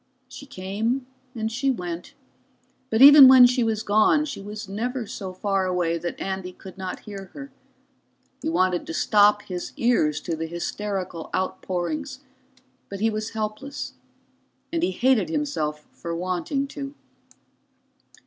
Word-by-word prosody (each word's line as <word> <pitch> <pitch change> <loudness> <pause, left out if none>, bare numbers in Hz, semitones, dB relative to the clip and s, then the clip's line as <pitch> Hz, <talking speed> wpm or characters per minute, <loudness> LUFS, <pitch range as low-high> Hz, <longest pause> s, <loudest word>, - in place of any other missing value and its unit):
She 280 +2 -11
came 225 +5 -2 0.3
and 220 -1 -2
she 265 +4 0
went, 180 +3 -4 0.7
but 225 +2 +4
even 285 -1 +11
when 260 -1 +9
she 245 0 +2
was 220 -1 -1
gone 215 +9 +3
she 285 -9 -6
was 210 +1 -7
never 235 +5 -3
so 195 -2 -6
far 195 0 -1
away 175 -2 0
that 175 +1 -5
Andy 190 -1 -4
could 185 0 -12
not 185 -1 -6
hear 195 -3 -9
her. 280 -2 -9 0.9
He 315 - -2
wanted 185 - +1
to 165 - -5
stop 210 +1 +4
his 180 -2 -6
ears 230 -11 +2
to 165 - -3
the 160 +1 -4
hysterical 180 0 -4
outpourings, 255 - -3 0.7
but 200 - -6
he 225 +2 +2
was 215 +1 -4
helpless, 215 +6 -4 0.8
and 335 - 0
he - - +2
hated 245 - +2
himself 220 - -2
for 170 0 -6
wanting 185 - -2
to. 280 0 -7
210 Hz, 145 wpm, -24 LUFS, 185-260 Hz, 0.9 s, even